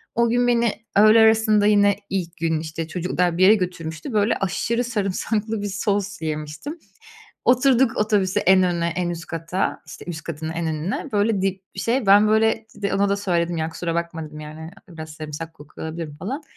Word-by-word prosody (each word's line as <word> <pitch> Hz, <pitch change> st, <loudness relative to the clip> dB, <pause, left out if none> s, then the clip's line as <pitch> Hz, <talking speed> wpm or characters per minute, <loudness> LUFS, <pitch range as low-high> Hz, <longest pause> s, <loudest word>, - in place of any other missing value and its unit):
O 235 Hz, 0 st, +3 dB
gün 245 Hz, +1 st, +2 dB
beni 235 Hz, -2 st, +3 dB, 0.2 s
öğle 215 Hz, +2 st, +7 dB
arasında 220 Hz, -2 st, +4 dB
yine 205 Hz, -1 st, +4 dB
ilk 180 Hz, -2 st, -3 dB
gün, 160 Hz, -2 st, 0 dB
işte, 160 Hz, 0 st, -5 dB
çocuklar 175 Hz, 0 st, -1 dB
bir 185 Hz, -, +3 dB
yere 210 Hz, +3 st, +8 dB
götürmüştü, 180 Hz, -, -4 dB
böyle, 210 Hz, +1 st, +2 dB
aşırı 230 Hz, +6 st, -1 dB
sarımsaklı 215 Hz, 0 st, -2 dB
bir 205 Hz, -, -3 dB
sos 200 Hz, -2 st, -2 dB
yemiştim. 155 Hz, -, -5 dB, 0.7 s
Oturduk 255 Hz, -1 st, +4 dB
otobüse, 205 Hz, -2 st, +1 dB
en 190 Hz, 0 st, +5 dB
öne, 170 Hz, -2 st, 0 dB
en 175 Hz, -1 st, -1 dB
üst 170 Hz, -1 st, -6 dB
kata, 165 Hz, +3 st, -2 dB
işte, -, -, -10 dB
üst 160 Hz, -2 st, -5 dB
katın 160 Hz, 0 st, -5 dB
en 165 Hz, 0 st, -3 dB
önüne, 160 Hz, -, -3 dB
böyle, 205 Hz, -1 st, +1 dB
dip 195 Hz, 0 st, -1 dB
bir 195 Hz, -, -5 dB
şey. 235 Hz, -1 st, 0 dB
Ben, 205 Hz, +2 st, +6 dB
böyle, 220 Hz, 0 st, +2 dB
de 200 Hz, -1 st, -2 dB
ona 200 Hz, +1 st, +2 dB
da 200 Hz, -, +1 dB
söyledim 175 Hz, -4 st, -1 dB
ya, 160 Hz, 0 st, -1 dB
“Kusura 165 Hz, 0 st, -4 dB
bakma,” 170 Hz, -1 st, -3 dB
dedim, 150 Hz, 0 st, -10 dB
yani, 155 Hz, +2 st, -9 dB, 0.2 s
“Biraz 160 Hz, -3 st, -9 dB
sarımsak 155 Hz, +1 st, -7 dB
kokuyor 145 Hz, +2 st, -10 dB
olabilirim,” 160 Hz, -2 st, -6 dB
falan. 265 Hz, -, -5 dB
190 Hz, 185 wpm, -22 LUFS, 165-215 Hz, 0.7 s, yere